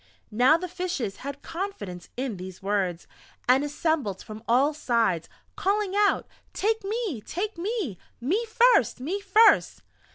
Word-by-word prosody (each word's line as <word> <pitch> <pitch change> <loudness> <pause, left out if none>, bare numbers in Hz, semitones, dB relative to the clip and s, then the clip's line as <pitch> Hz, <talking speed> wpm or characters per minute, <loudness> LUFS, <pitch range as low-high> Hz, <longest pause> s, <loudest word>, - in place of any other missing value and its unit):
Now 250 +9 +5
the 365 +2 -5
Fishes 350 - -3
had 280 +1 -7
confidence 210 - -6
in 250 -5 -2
these 185 +1 -9
words, 190 -4 -1 0.4
and 260 +3 +5
assembled 290 - -1
from 215 0 -9
all 265 +6 +3
sides, 230 - 0 0.3
calling 400 0 0
out: 410 0 +3 0.3
"Take 440 +1 0
me!... 405 - -2
Take 405 - -3
me!... 360 - -3 0.2
Me 345 - 0
first! 485 - +4
Me 335 +10 -2
first!"... 410 +3 +4
295 Hz, 135 wpm, -26 LUFS, -, 0.4 s, Now